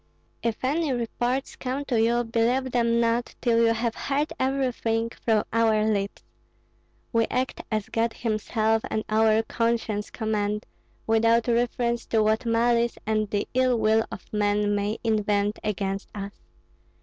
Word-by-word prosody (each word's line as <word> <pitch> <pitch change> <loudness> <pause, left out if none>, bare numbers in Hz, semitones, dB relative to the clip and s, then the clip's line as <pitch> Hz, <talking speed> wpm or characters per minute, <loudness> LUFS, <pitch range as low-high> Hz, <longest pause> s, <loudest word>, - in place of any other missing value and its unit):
If 230 0 -2
any 300 +2 +1
reports 245 +2 -2
come 265 +2 -3
to 240 -5 +1
you, 235 +1 +2
believe 240 +3 0
them 235 -1 +2
not 235 +1 0
till 230 -2 +2
you 230 - +4
have 230 0 -1
heard 285 +4 -1
everything 245 -4 0
from 220 -3 +1
our 220 -2 +3
lips. 200 -2 -1 0.9
We 230 -1 +3
act 255 0 -2
as 215 -2 -1
God 230 0 0
himself 220 0 0
and 215 - -1
our 220 0 +3
conscience 230 -3 -1
command, 210 -2 -2 0.4
without 230 +1 +3
reference 235 0 0
to 220 -1 +2
what 220 +3 +1
malice 235 +1 +2
and 215 -1 0
the 205 0 -1
ill 255 -1 +3
will 220 0 +3
of - - -8
man 205 0 +1
may 205 +2 -1
invent 210 -2 +1
against 195 -2 -2
us. 200 -1 -5
230 Hz, 145 wpm, -25 LUFS, 215-240 Hz, 0.9 s, you